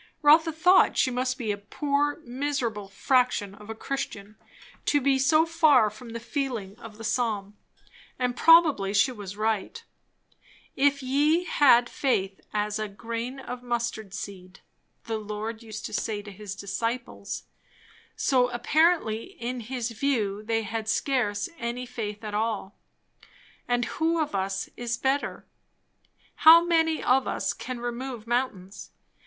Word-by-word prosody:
Rotha 320 +2 +6
thought 360 +4 +4
she 260 - +3
must 255 +1 -1
be 220 -4 -2
a 205 - -2
poor, 290 +7 -1
miserable 245 -5 -2
fraction 205 -1 +1
of 210 +1 -14
a 225 - -5
Christian, 220 -5 -5 0.5
to 290 - +4
be 270 0 +2
so 310 +4 +4
far 310 -10 +4
from 230 +3 -12
the 230 0 -5
feeling 235 -6 -4
of 220 -3 -11
the 225 - -9
psalm; 215 -3 -1 0.6
and 250 -1 -1
probably 295 - +5
she 230 +6 +4
was 205 -4 -8
right. 220 - -2 0.9
"If 280 0 +2
ye 295 +6 +2
had 255 -8 +5
faith 195 -10 -1
as 210 0 -1
a 215 - -2
grain 230 +5 -5
of 250 -1 -7
mustard 235 -4 -3
seed," 185 -3 -8 0.4
the 225 -1 -3
Lord 215 +2 -5
used 220 -2 -8
to - - -6
say 210 -2 -2
to 205 - -10
his 200 0 -8
disciples; 230 +5 -4 0.7
so 250 -3 +2
apparently 245 -2 +2
in 245 +2 -4
his 240 0 -4
view 220 -5 -1
they 225 +1 -1
had 220 +1 -4
scarce 225 -5 0
any 240 +1 -3
faith 215 -4 -6
at 210 -1 -5
all. 210 -2 -2 0.9
And 245 -1 +1
who 325 +5 0
of 305 -7 -1
us 195 0 -2
is 235 -1 -3
better? 270 +3 -1 0.9
How 330 +2 +8
many 325 -2 +2
of 255 +1 +3
us - - -1
can 255 -1 -6
remove 240 -1 -5
mountains? 230 -6 -3
235 Hz, 145 wpm, -26 LUFS, 210-270 Hz, 0.9 s, How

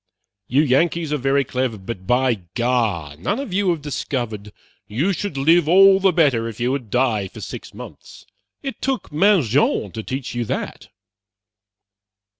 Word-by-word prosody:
You 140 +5 +3
Yankees 155 +3 +1
are - - +1
very 135 +1 +1
clever, 125 -3 -2
but 95 -1 -8
by 125 -3 +2
gar, 115 - 0
none 200 - -2
of 275 -9 -5
you 195 0 +1
have 165 -4 -1
discovered 120 -7 -4 0.4
you 145 - 0
should 185 -4 -4
live 160 +3 +3
all 195 +2 +7
the 195 -1 +3
better 140 -9 +2
if 115 -1 -8
you 120 +2 0
would 130 -5 -4
die 115 -5 +1
for - - -12
six - - -8
months. - - -12 0.4
It 270 -2 -6
took 265 - -2
Mangin 150 - +2
to 110 - -5
teach 130 +3 -5
you 120 0 -1
that." - - -5
130 Hz, 160 wpm, -21 LUFS, 115-170 Hz, 0.4 s, all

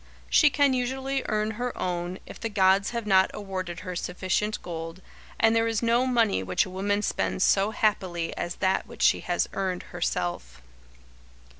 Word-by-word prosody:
She 300 - +6
can 285 -1 +3
usually 265 +2 -1
earn 215 0 0
her 250 0 -3
own, 175 0 -3
if - - -11
the 225 - -3
gods 195 -1 +3
have 235 -2 -4
not 190 -2 +4
awarded 185 -4 -5
her 180 -1 -6
sufficient 185 +4 -1
gold, 165 0 -6 0.4
and 225 0 +4
there 225 0 +3
is 225 0 -1
no 235 +2 +3
money 230 - +2
which 90 -1 +1
a 185 - -9
woman 205 +2 -1
spends 190 - 0
so 200 +1 +3
happily 185 -6 -1
as 175 0 -4
that 190 -1 0
which - - -5
she - - +5
has 175 -1 -1
earned 185 -2 -2
herself. 85 - -3
195 Hz, 170 wpm, -26 LUFS, 175-225 Hz, 0.4 s, She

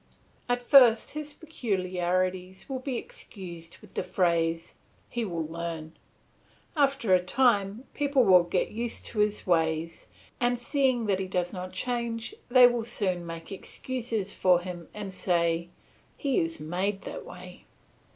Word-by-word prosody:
At 245 0 +1
first 245 -4 +6
his 300 0 -5
peculiarities 185 - -2
will 265 -2 -3
be 260 -1 -3
excused 170 -8 -8
with - - -16
the - - -1
phrase, 165 -2 0 0.4
"He 240 - -1
will 170 -6 -3
learn." 165 -1 -5 0.8
After 275 -8 +2
a 180 - +5
time 205 0 +2
people 280 -3 +2
will 185 -4 +7
get 175 +1 -1
used 235 +2 -3
to 215 - -3
his 210 0 +1
ways, 165 -1 0 0.3
and 245 0 +2
seeing 255 -1 +1
that 195 -2 +1
he 190 - -2
does 180 -1 -1
not 185 -1 -5
change 235 - -2 0.2
they 250 0 +8
will 240 -1 +3
still 195 -6 0
make 165 0 -8
excuses 225 0 -3
for 180 -2 +4
him 175 -2 -7
and 200 -2 -6
say, 170 -2 +1 0.5
"He 275 -3 +1
is 165 0 -2
made 185 +6 -2
that - - -6
way." - - -11
195 Hz, 145 wpm, -28 LUFS, 175-245 Hz, 0.8 s, they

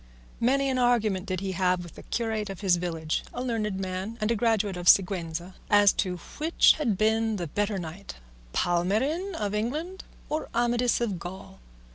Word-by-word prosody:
Many 275 +4 +2
an 260 -1 0
argument 220 -6 +2
did 185 -2 -2
he 195 -1 -2
have 180 -1 +1
with 175 - -11
the - - -11
curate 220 -3 -2
of 195 -1 -7
his 185 -3 +3
village 165 -3 -2
(a 245 - -3
learned 215 -5 -2
man, 190 +4 -4
and 215 +1 0
a - - +2
graduate 215 -3 +1
of 175 0 -5
Siguenza) 180 -2 +2 0.2
as 205 -1 +6
to 180 -2 -1 0.2
which 320 +3 +5
had 230 -10 0
been 220 +1 +2
the 180 -4 -3
better 205 +5 -1
knight, 175 +3 -7 0.4
Palmerin 225 - 0
of 205 -5 -2
England 300 - -3 0.2
or 310 +1 -3
Amadis 240 0 +2
of 205 -7 -1
Gaul. 175 - -9
205 Hz, 175 wpm, -27 LUFS, 185-235 Hz, 0.4 s, as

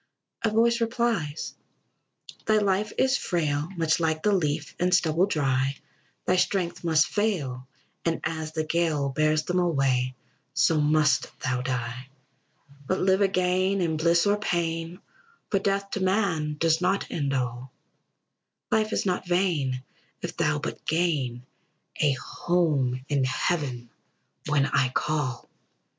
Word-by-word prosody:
A 225 - +2
voice 235 +2 +3
replies: 230 - -1 0.9
"Thy 215 -1 +4
life 205 0 +1
is 265 +1 +3
frail, 155 -3 -1
Much 165 0 +2
like 160 -1 0
the 210 - +3
leaf 150 -4 -1
and 180 +1 +2
stubble 175 +1 +3
dry; 135 -5 0 0.5
Thy 185 - +2
strength 180 -2 0
must 160 -1 +4
fail, 160 -12 -2 0.4
and 165 -1 0
as 155 -1 -3
the 155 - -1
gale 155 -3 0
Bears 155 +2 +1
them 180 +3 0
away, 135 -7 +1 0.4
so 155 -1 +3
must 150 0 +3
thou 125 -1 -1
die; 125 0 -3 0.8
"But 185 - 0
live 190 +1 +3
again, 185 0 +2
in 165 -3 0
bliss, 170 +3 +3
or 205 0 +3
pain; 170 -1 -2 0.5
For 195 - +3
death 200 0 -1
to - - -2
man 185 -6 +1
does 165 +1 +2
not 190 +2 +1
end 140 -4 -1
all; 125 0 -3 1.0
Life 220 0 +2
is - - 0
not 180 -1 -1
vain, 160 -9 0 0.4
if - - -4
thou - - +1
but - - -5
gain 145 -8 0 0.5
A 145 -2 +3
home 135 -4 0
in 140 -2 +1
heaven, 130 -2 -1 0.6
when 145 -2 +3
I 140 -2 +2
shall 125 - -3
call! 150 -5 -2
160 Hz, 140 wpm, -26 LUFS, 140-185 Hz, 1.0 s, Thy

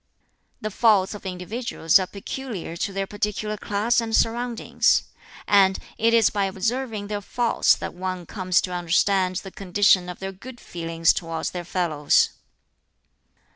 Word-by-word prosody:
"The 215 - -3
faults 210 -3 +3
of 205 -2 -8
individuals 185 -1 +1
are 185 - -2
peculiar 200 -3 -6
to 200 +4 -2
their 195 0 -2
particular 210 +1 -3
class 210 +3 0
and 225 -1 -1
surroundings; 235 +1 +1 0.4
and 195 -2 +5 0.2
it 230 +1 +3
is 230 -2 +4
by 200 -1 0
observing 220 +3 -2
their 205 0 -4
faults 235 +3 +2
that - - -6
one 185 0 -4
comes 185 -2 +1
to 180 - -5
understand 185 +2 +1
the 195 +1 -5
condition 190 -1 +2
of 180 - -6
their 195 0 -5
good 240 +6 -11
feelings 165 -1 0
towards 165 -2 -3
their 175 -1 -5
fellows. 160 -5 +2
195 Hz, 145 wpm, -24 LUFS, 180-220 Hz, 0.4 s, and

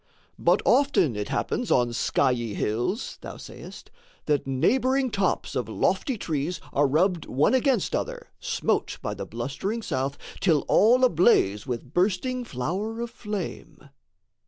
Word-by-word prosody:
"But - - +3
often 275 - +3
it 105 0 -4
happens 245 - -1
on 120 -1 +3
skiey 120 -2 0
hills" 120 - -2
thou - - -8
sayest, - - -11 0.3
"That 145 -3 0
neighbouring 255 - +2
tops 200 -2 -1
of - - -2
lofty 265 -6 0
trees 160 -1 -2
are 145 0 +3
rubbed 170 +4 +1
One 140 - +2
against 260 0 +2
other, - - -4
smote 470 -2 -1
by - - -2
the - - -6
blustering 220 +4 -4
south, 135 -3 -2 0.2
Till 160 -6 +2
all 245 +5 +5
ablaze 155 - +3
with 125 +2 -5
bursting 215 +8 +1
flower 190 - -3
of 235 -1 -4
flame." 210 -6 -6
185 Hz, 135 wpm, -26 LUFS, -, 0.3 s, all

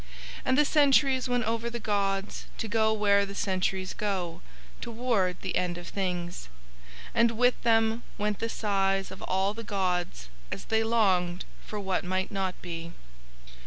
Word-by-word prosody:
And 260 - +2
the 295 - +5
centuries 275 -3 +4
went 245 0 +1
over 230 +1 -1
the 235 0 -4
gods 200 -2 -1
to 225 - -3
go 220 0 +2
where 205 -2 +4
the 200 0 -6
centuries 190 -2 -1
go, 180 -5 -2 0.4
toward 225 -6 0
the 190 - -2
End 175 -1 0
of 175 -1 -8
Things, 180 - -3 0.6
and 230 -1 +3
with 245 +1 +3
Them 225 0 +3 0.2
went 210 -1 -1
the 230 - -2
sighs 195 -3 0
of 190 - -9
all 190 +2 0
the 230 +1 -7
gods 180 - -1 0.2
as - - -5
They 220 0 +2
longed 190 -6 +2 0.2
for 210 - -5
what 190 -2 -1
might 185 +1 -1
not 190 -2 -2
be. 170 -1 -6
200 Hz, 160 wpm, -28 LUFS, 185-225 Hz, 0.6 s, the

